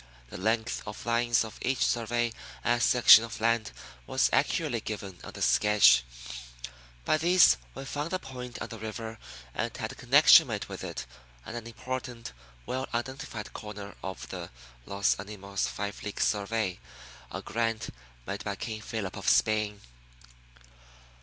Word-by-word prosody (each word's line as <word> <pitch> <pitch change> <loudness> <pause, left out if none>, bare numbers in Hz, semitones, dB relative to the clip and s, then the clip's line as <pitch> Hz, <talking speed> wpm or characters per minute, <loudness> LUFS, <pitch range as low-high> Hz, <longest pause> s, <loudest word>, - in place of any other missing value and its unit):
The - - -6
length 110 +4 0
of 105 - -7
lines 120 0 +2
of 110 - -10
each 130 -1 +1
survey 120 0 0 0.3
and 120 0 +2
section 120 -3 +8
of 115 - -7
land 115 0 +1 0.4
was 130 - +2
accurately 135 -2 +1
given 100 -5 -6
on - - -9
the - - -3
sketch. 100 -14 +5 1.0
By 155 - +3
these 175 +3 +6 0.2
we 135 - -6
found 145 +3 -3
the 185 - 0
point 125 -6 -8
on - - -7
the 115 - -8
river 110 +1 -6 0.3
and - - -3
had - - -4
a - - -8
"connection" - - +7
made - - -3
with - - -8
it - - -5 0.4
and 115 - -7
an 115 -1 -6
important, 125 - -6 0.3
well 130 - -3
identified 125 -2 -5
corner 105 -1 -8
of 95 0 -6
the 90 -2 -6 0.4
Los 100 0 +2
Animos 100 -1 -3
five 100 0 -5
league 105 - -6
survey 105 -2 0 0.5
a - - -6
grant 115 0 -1 0.4
made 100 +7 -4
by 100 -1 -3
King 110 +1 -5
Philip 110 -3 -4
of - - 0
Spain. 105 -1 +2
115 Hz, 155 wpm, -29 LUFS, 105-120 Hz, 1.0 s, section